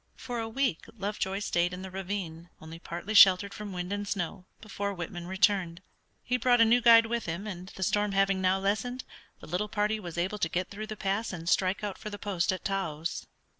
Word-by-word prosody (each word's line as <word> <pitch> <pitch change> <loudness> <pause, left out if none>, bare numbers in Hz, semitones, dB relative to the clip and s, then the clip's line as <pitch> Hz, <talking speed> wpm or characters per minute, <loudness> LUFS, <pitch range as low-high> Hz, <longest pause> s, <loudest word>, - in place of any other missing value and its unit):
For 245 -2 -5
a 225 0 -3
week 250 - -1
Lovejoy 195 -1 -2
stayed 175 -3 +1
in 180 +1 -6
the 190 - -7
ravine, 180 -3 -5
only 160 +1 -10
partly 175 +5 -5
sheltered 200 -1 +7
from 210 -1 -7
wind 180 +1 -4
and 205 0 -3
snow, 180 -2 -3
before 200 -2 -4
Whitman 175 0 -6
returned. 190 -2 +1 0.4
He 250 - 0
brought 245 0 +3
a 230 - +7
new 240 +2 +4
guide 230 -1 +8
with 235 -2 -2
him, 170 +5 -4
and, 185 -3 -6
the 190 - -3
storm 205 +2 +1
having 195 -1 +2
now 185 0 +3
lessened, 215 +6 -1 0.4
the - - -11
little 185 +6 -2
party 210 +1 0
was 175 -4 -8
able 190 +5 -1
to 165 - 0
get 180 +2 -2
through 215 +2 -6
the 215 -1 -6
pass 200 +4 -1
and 170 -3 -7
strike 185 +3 +1
out 205 -2 -4
for 215 - -6
the 205 - -6
post 190 -4 0
at 185 - -5
Taos. 170 -5 -3
195 Hz, 215 wpm, -29 LUFS, 180-210 Hz, 0.4 s, guide